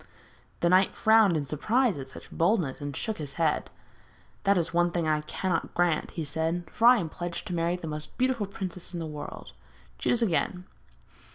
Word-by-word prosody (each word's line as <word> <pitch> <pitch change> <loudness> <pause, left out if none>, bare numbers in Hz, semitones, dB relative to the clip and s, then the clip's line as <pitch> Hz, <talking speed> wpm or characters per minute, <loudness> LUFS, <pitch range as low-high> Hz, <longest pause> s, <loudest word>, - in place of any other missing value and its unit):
The 170 - +3
knight 185 +2 +4
frowned 220 -6 +5
in 145 - -2
surprise 215 - +1
at 135 -2 -6
such - - -12
boldness, 165 - +1
and 145 -1 -4
shook 220 -4 -2
his 145 -2 -5
head. 160 -2 0 0.8
'That 200 0 +4
is 170 -2 +1
the 170 - -2
one 175 0 +4
thing 170 -2 -1
I 155 -1 +2
cannot 170 +3 -2
grant,' 175 -3 +1
he 165 - -4
said, 160 +4 -1
'for 230 - +3
I 250 0 +8
am 175 - -1
pledged 175 +2 -5
to - - -3
marry 170 +1 +1
the 180 - -7
most 150 -1 -6
beautiful 255 -5 +1
princess 185 -2 -6
in - - -3
the 165 - -3
world. 150 -1 -7 0.5
Choose 240 -1 +2
again.' 180 -2 0
175 Hz, 195 wpm, -28 LUFS, 155-195 Hz, 0.8 s, I